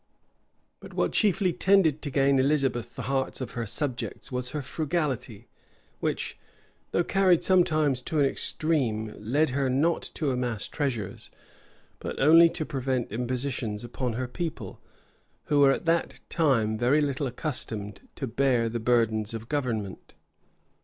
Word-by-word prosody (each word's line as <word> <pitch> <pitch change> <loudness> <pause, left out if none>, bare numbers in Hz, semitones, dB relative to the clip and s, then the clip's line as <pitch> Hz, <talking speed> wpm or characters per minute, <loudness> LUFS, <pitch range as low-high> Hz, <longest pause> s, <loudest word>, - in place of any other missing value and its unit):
But - - -12
what - - +1
chiefly 195 -4 +2
tended 180 -7 +3
to 145 - -4
gain 135 0 +3
Elizabeth 130 -4 +1
the - - -5
hearts 135 0 -1
of 130 - -5
her 115 -2 -4
subjects, 130 +3 -4
was 125 -1 -2
her 150 0 -4
frugality, 140 - -3 0.5
which, - - -3 0.5
though 175 - +1
carried 185 -2 +3
sometimes 155 -8 +3
to 155 +4 -2
an 140 - +5
extreme, 125 -8 -1
led 135 +8 +1
her 135 0 0
not 155 +6 +2
to 150 -4 0
amass 125 -4 -2
treasures, 125 - -3 0.7
but - - -5
only 165 +4 +7
to 155 - -3
prevent 130 -5 -2
impositions 125 -2 -2
upon 120 0 -3
her 125 +2 -3
people, 150 - -5 0.6
who 145 - +1
were 140 -1 +7
at 135 - -2
that 165 0 0
time 115 -10 +1
very 130 +5 +3
little 140 -1 -1
accustomed 115 -7 -3
to 135 - -3
bear 125 -1 +1
the 120 +1 -3
burdens 115 -2 +1
of 115 +1 -8
government. 115 -9 -3
135 Hz, 145 wpm, -27 LUFS, 120-150 Hz, 0.7 s, only